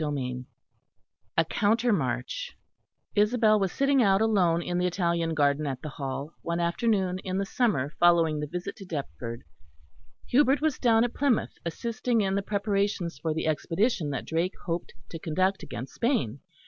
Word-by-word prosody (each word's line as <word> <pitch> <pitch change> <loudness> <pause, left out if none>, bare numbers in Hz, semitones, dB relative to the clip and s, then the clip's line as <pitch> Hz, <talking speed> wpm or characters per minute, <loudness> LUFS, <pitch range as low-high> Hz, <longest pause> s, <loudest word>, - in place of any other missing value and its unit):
CHAPTER 150 -2 -1
IV 125 -1 -4 0.9
A 165 - +4
COUNTER 225 +7 +2
MARCH 130 - -2 0.6
Isabel 215 0 +4
was 195 -2 0
sitting 275 -1 +3
out 195 -3 +4
alone 185 -6 +2
in 175 +1 -1
the 180 - +2
Italian 170 -2 0
garden 145 0 +2
at 130 -2 -4
the 155 - -4
Hall, 140 +1 -5
one 170 0 -2
afternoon 185 +1 +1
in 190 0 -3
the 195 - 0
summer 195 - 0
following 165 -3 +4
the 150 - -3
visit 180 +5 -5
to 195 - -9
Deptford. 125 -7 -5 0.8
Hubert 275 +2 +4
was 310 -3 0
down 230 -2 +4
at 240 - -1
Plymouth, 275 -5 +1
assisting 230 +6 -1
in 190 -1 0
the 200 - +1
preparations 200 -3 -1
for 160 - -1
the 160 - -2
expedition 165 - 0
that 135 - -3
Drake 170 +4 -1
hoped 170 0 -3 0.2
to 165 - -6
conduct 185 +5 0
against 135 -5 -7
Spain. 145 - 0
180 Hz, 165 wpm, -27 LUFS, 155-215 Hz, 0.9 s, A